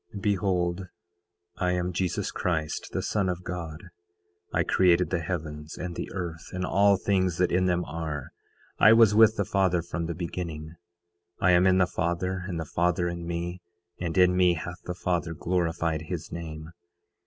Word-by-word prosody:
9:15 100 - -5
Behold, 90 -2 0 0.7
I 90 -1 +1
am 90 0 -1
Jesus 90 0 -1
Christ 80 -4 -2
the - - -2
Son 100 -3 0
of 90 0 -3
God. 85 -2 -6 0.7
I - - +2
created 90 -1 +3
the 90 - +1
heavens 75 -2 -5
and 90 -1 -5
the - - -4
earth, 85 -3 -5
and 90 0 -2
all 100 +2 +4
things 95 -3 +1
that 90 -1 +2
in 90 +1 +2
them 90 -1 +1
are. 75 -2 -5 0.5
I 110 - +8
was 115 -2 +6
with 110 +1 +6
the 100 - +1
Father 90 -3 +1
from 85 -1 -4
the 85 - -3
beginning. 80 -2 -5 0.7
I 90 - +4
am 90 +1 +5
in 95 0 +4
the 95 - +5
Father, 90 +1 -2
and 85 -4 -3
the 80 - -3
Father 85 +3 +1
in 85 -1 -5
me; 85 +1 -4 0.4
and 85 -1 -3
in 90 0 +5
me 90 -1 +4
hath 90 +2 -7
the 90 - -4
Father 85 -2 -1
glorified 85 -2 -1
his 85 -2 -5
name. 80 -1 -7
90 Hz, 175 wpm, -27 LUFS, 85-90 Hz, 0.7 s, I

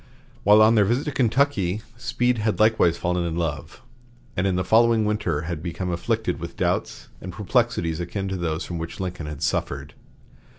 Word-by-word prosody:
While 105 +2 +7
on 110 +1 +6
their 105 -3 +5
visit 120 +7 0
to 150 - -2
Kentucky, 115 -6 +1
Speed 120 0 0
had 105 0 0
likewise 110 -6 +4
fallen 90 0 -1
in 85 -1 -2
love, 80 -4 -4 0.5
and 90 +2 +1
in 95 - +1
the 90 - 0
following 115 +2 +4
winter 105 -8 -1
had 80 -1 -4
become 90 +1 -4
afflicted 85 - -1
with - - -7
doubts - - -1
and 90 - -6
perplexities 100 -4 0
akin 95 +3 -3
to 95 - -2
those 85 -2 -2
from 85 -2 -5
which 80 0 -6
Lincoln 90 -4 -4
had 75 -2 -6
suffered. 70 +2 -2
95 Hz, 180 wpm, -24 LUFS, 85-110 Hz, 0.5 s, While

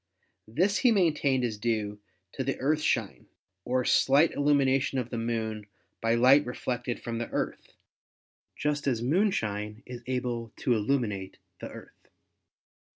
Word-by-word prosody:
This 180 - +1
he 250 - +4
maintained 150 - +2
is 110 -3 -2
due 105 -2 -1 0.3
to 135 - -3
the 135 0 -2
earthshine 150 +3 0 0.4
or 125 0 0
slight 145 +4 +4
illumination 140 -2 +2
of 125 -2 -3
the 120 - -3
Moon 110 -2 -3 0.3
by 115 +1 +2
light 130 +5 +6
reflected 125 -1 -3
from 115 -1 -4
the 120 - -4
Earth, - - -4 0.8
just 150 -1 -1
as 120 -4 0
moonshine 110 - 0
is 125 -1 -8
able 120 -3 -3
to 125 - +1
illuminate 105 -4 -1 0.2
the - - -7
Earth. - - -14
125 Hz, 135 wpm, -28 LUFS, 115-140 Hz, 0.8 s, light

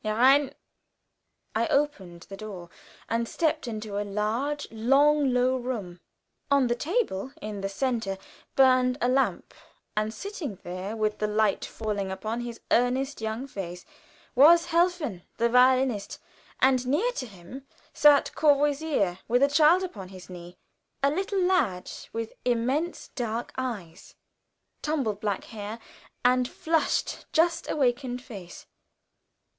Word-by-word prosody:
"Herein!" 260 +6 +4 1.0
I 225 +1 +1
opened 195 -13 -1
the 195 - -9
door, 195 -5 -9 0.4
and 230 0 -1
stepped 315 -4 0
into 215 -3 -4
a - - 0
large, 225 +9 -2
long, 275 +5 +3
low 250 +1 +2
room. 220 -9 -5 0.5
On 280 -2 +4
the 240 - +1
table, 270 - -1
in 210 -5 -6
the 195 - -2
center, 225 -3 -1 0.4
burned 255 -1 +4
a 245 - +1
lamp, 265 +2 0 0.4
and 215 0 0
sitting 310 - -6
there, 185 +4 -5
with 215 -1 -1
the 210 - 0
light 210 -1 +1
falling 205 -3 -3
upon 215 +5 -3
his 240 -1 -7
earnest 255 +2 +1
young 220 +4 -3
face, 180 -8 -7 0.5
was 335 +6 +7
Helfen, 335 - +1 0.2
the 235 0 +2
violinist, 250 -3 +3 0.4
and 260 -1 +3
near 350 - +2
to 260 - -5
him 215 +8 -12 0.3
sat 295 -1 +5
Courvoisier, 290 - +2
with 245 +4 +3
a - - +6
child 315 +5 +5
upon 200 - -7
his 185 -1 -12
knee, 175 0 -10 0.5
a 280 - +4
little 385 +3 0
lad 270 - +1 0.2
with 225 0 -4
immense 255 +8 -1
dark 235 -2 -4
eyes, 200 -10 -6 0.7
tumbled 265 -10 -1
black 205 -3 -1
hair, 215 -1 -7 0.5
and 250 0 +4
flushed, 325 -1 -1
just 335 +1 +2
awakened 250 -2 0
face. 200 -9 -10
245 Hz, 130 wpm, -27 LUFS, 210-280 Hz, 1.0 s, was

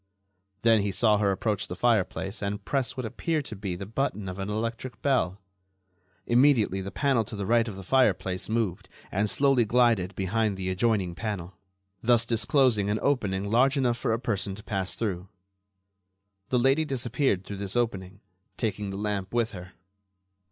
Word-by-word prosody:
Then 115 -2 +5
he 100 0 -1
saw 105 +1 +3
her 100 -2 +2
approach 100 +1 -1
the - - -5
fireplace 110 -3 0
and 100 0 -3
press 135 -3 -1
what 130 - -3
appeared 155 +6 -2
to 110 - -6
be 95 -2 -4
the 95 - -6
button 105 -2 -2
of 95 +1 -6
an 95 +1 -3
electric 115 +4 -4
bell. 125 -9 +1 0.9
Immediately 120 -6 +3
the 95 - -5
panel 135 -1 +1
to 110 - -7
the 100 -1 -3
right 115 +2 +3
of 105 - -5
the 95 - -8
fireplace 95 -5 +1
moved 110 -6 -1 0.2
and 100 +2 0
slowly 135 -1 +3
glided 110 -5 +2
behind 100 +1 0
the 95 -1 -2
adjoining 95 -2 +1
panel, 95 -2 -4 0.5
thus 115 0 +3
disclosing 115 -2 +2
an 105 - +1
opening 105 -9 +1
large 125 +7 +3
enough 125 -3 +2
for 115 - -1
a 110 - +2
person 100 -5 -2
to 110 - -12
pass 95 -3 -2
through. 95 -4 -3 1.2
The 125 - +2
lady 135 +5 +3
disappeared 125 - 0
through 100 - -6
this 100 +1 -4
opening, 100 -5 -2 0.4
taking 105 -2 -2
the 95 - -5
lamp 100 -2 -2
with 115 -2 +1
her. 90 -1 -10
105 Hz, 175 wpm, -27 LUFS, 95-120 Hz, 1.2 s, Then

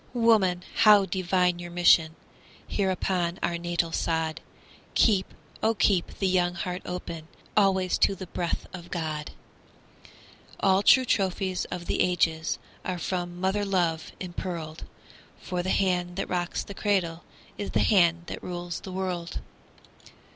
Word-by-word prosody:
Woman, 210 -7 +3
how 210 -2 +7
divine 180 -2 +1
your 175 0 -7
mission 170 -2 +4 0.5
Here 195 -2 0
upon 180 -2 -1
our 170 0 0
natal 170 -1 -1
sod! 160 -1 -1 0.5
Keep, 195 -4 +3 0.3
oh, 225 +1 +2
keep 185 -3 +1
the 195 - +1
young 180 -1 +2
heart 180 +1 -4
open 165 -3 -6 0.3
Always 190 -3 +3
to 195 - +3
the 190 - -7
breath 175 -1 -3
of 175 -2 -9
God! 155 -3 -3 1.3
All 190 0 +4
true 255 +5 +6
trophies 190 -3 0
of 175 -1 -6
the - - 0
ages 165 -3 +1 0.3
Are 185 -1 -2
from 175 0 -3
mother 190 +3 0
love 175 -5 0
impearled; 175 -3 -5 0.5
For 180 -2 -3
the 185 - -3
hand 180 -2 +1
that 195 - -2
rocks 175 -1 -2
the 200 - -9
cradle 185 -5 0 0.4
Is 205 - -3
the - - +1
hand 170 -5 +4
that - - -6
rules 175 -1 -5
the 190 - -9
world. 180 -2 -3
180 Hz, 140 wpm, -27 LUFS, 170-190 Hz, 1.3 s, how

